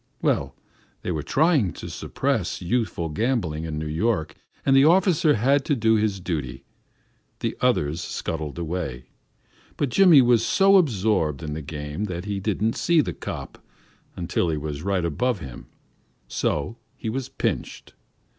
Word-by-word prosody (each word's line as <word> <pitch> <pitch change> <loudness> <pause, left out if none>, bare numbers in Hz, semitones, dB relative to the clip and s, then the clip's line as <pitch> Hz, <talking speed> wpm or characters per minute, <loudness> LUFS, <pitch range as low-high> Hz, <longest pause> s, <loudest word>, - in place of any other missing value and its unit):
Well, 70 0 0 0.5
they - - -2
were 80 -3 -2
trying 145 - +2
to - - -8
suppress 130 -10 -2
youthful 90 -3 -1
gambling 90 -5 -1
in 80 -2 -4
New 80 - -3
York, 80 0 -1 0.3
and 135 - +4
the 135 - +7
officer 170 -2 +4
had 135 +5 +2
to 145 - +1
do 110 -2 +3
his 105 -3 +1
duty. 70 -8 -4 0.8
The - - -2
others 75 +4 +1
scuttled 80 -2 -4
away, 80 -7 -4 0.7
but 145 - 0
Jimmy 170 -3 +7
was 120 -2 +4
so 195 - +5
absorbed 100 - +1
in 75 -1 -4
the 80 - -4
game 75 +5 -5
that 90 -2 -5
he 100 -1 -2
didn't 105 +2 -1
see 170 -2 +3
the - - -3
"cop" - - -7 0.5
until 85 0 -1
he 80 - -1
was 75 -1 -5
right 95 -1 0
on 120 - 0
him, 65 -6 -10 0.6
so 75 - -2 0.2
he - - -6
was 130 +1 -4
"pinched." - - -3
95 Hz, 155 wpm, -24 LUFS, 75-125 Hz, 0.8 s, the